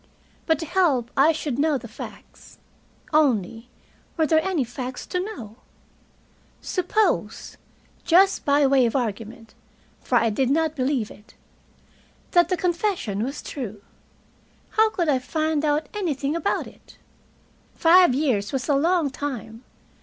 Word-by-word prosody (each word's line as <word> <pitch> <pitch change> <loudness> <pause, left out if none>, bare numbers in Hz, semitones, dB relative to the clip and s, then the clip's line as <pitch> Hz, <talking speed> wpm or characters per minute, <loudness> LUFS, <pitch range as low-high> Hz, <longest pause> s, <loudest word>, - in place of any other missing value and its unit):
But 320 -2 +3
to 325 - -5
help 300 -9 +1
I 285 +4 +5
should 295 -5 -3
know 300 -1 +2
the - - -9
facts. - - -12 0.6
Only, 235 -6 +1 0.5
were 320 - +3
there 315 0 +3
any 360 -7 0
facts 250 +1 -6
to 360 - -3
know? 300 - -7 1.0
Suppose 390 +4 -1 0.5
just 380 +3 +4
by 285 0 +3
way 265 -2 +4
of 230 - -4
argument, 225 -2 -4 0.5
for 255 - -2
I 230 -1 +2
did 255 +4 0
not 315 +2 +1
believe 255 -5 -1
it 210 +2 -17 1.0
that 345 -1 +4
the 365 - 0
confession 340 - -1
was 275 +4 -5
true; 215 -7 -7 0.9
how 440 0 +4
could 345 -6 -2
I 275 -4 +2
find 310 +2 -1
out 300 0 0
anything 305 -7 -2
about 335 - -1
it? - - -17 0.8
Five 345 -4 +5
years 245 -8 0
was 260 -3 -3
a 290 - +2
long 320 +1 +2
time. 245 -5 -6
290 Hz, 140 wpm, -23 LUFS, 245-330 Hz, 1.0 s, I